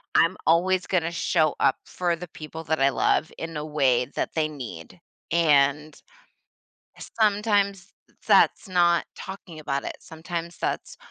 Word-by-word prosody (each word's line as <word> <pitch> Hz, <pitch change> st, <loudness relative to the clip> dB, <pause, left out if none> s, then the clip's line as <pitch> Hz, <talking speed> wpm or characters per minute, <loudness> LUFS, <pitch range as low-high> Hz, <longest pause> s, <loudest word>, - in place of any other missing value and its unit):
I'm 165 Hz, +3 st, +4 dB
always 180 Hz, +3 st, +2 dB
gonna 170 Hz, -3 st, 0 dB
show 160 Hz, -2 st, +1 dB
up 135 Hz, -1 st, +3 dB
for 175 Hz, -2 st, -1 dB
the 180 Hz, +2 st, -8 dB
people 160 Hz, +1 st, -9 dB
that 160 Hz, 0 st, 0 dB
I 135 Hz, -, +5 dB
love 140 Hz, -, +1 dB
in 165 Hz, -1 st, -5 dB
a 150 Hz, -, -4 dB
way 135 Hz, -5 st, +2 dB
that -, -, -2 dB
they 155 Hz, -1 st, +1 dB
need. 115 Hz, -, -9 dB, 0.3 s
And 150 Hz, -2 st, +2 dB, 1.2 s
sometimes 205 Hz, -2 st, +1 dB, 0.4 s
that's -, -, +4 dB
not 175 Hz, -2 st, +3 dB
talking 190 Hz, -4 st, -9 dB
about 140 Hz, -2 st, -3 dB
it. -, -, -4 dB
Sometimes 170 Hz, +1 st, -6 dB
that's -, -, -3 dB
165 Hz, 140 wpm, -25 LUFS, 150-180 Hz, 1.2 s, I